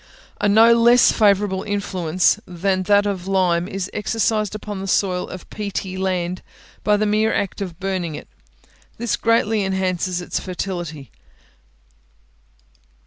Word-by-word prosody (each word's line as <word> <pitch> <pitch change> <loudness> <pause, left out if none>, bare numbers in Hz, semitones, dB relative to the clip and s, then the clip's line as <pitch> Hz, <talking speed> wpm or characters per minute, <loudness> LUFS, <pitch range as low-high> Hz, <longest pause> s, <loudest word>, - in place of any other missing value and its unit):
A 205 - +2
no 225 +3 +6
less 235 +1 +5
favourable 200 -3 +2
influence 185 -3 0
than 185 +2 -1
that 205 0 +4
of 190 -3 -3
lime 180 -3 +1
is 195 -1 -4
exercised 215 -1 -1
upon 210 -2 -6
the 195 - -5
soil 185 -1 0
of 185 - -9
peaty 200 -2 -4
land 185 -1 -2 0.4
by 210 -1 +3
the 215 - +1
mere 215 +1 +2
act 200 +1 -2
of 180 -3 -6
burning 185 -5 -3
it: - - -9 0.7
this 235 -1 -1
greatly 225 -2 +1
enhances 185 -1 -1
its 175 - -3
fertility. 175 - -5
195 Hz, 135 wpm, -21 LUFS, 180-210 Hz, 0.7 s, no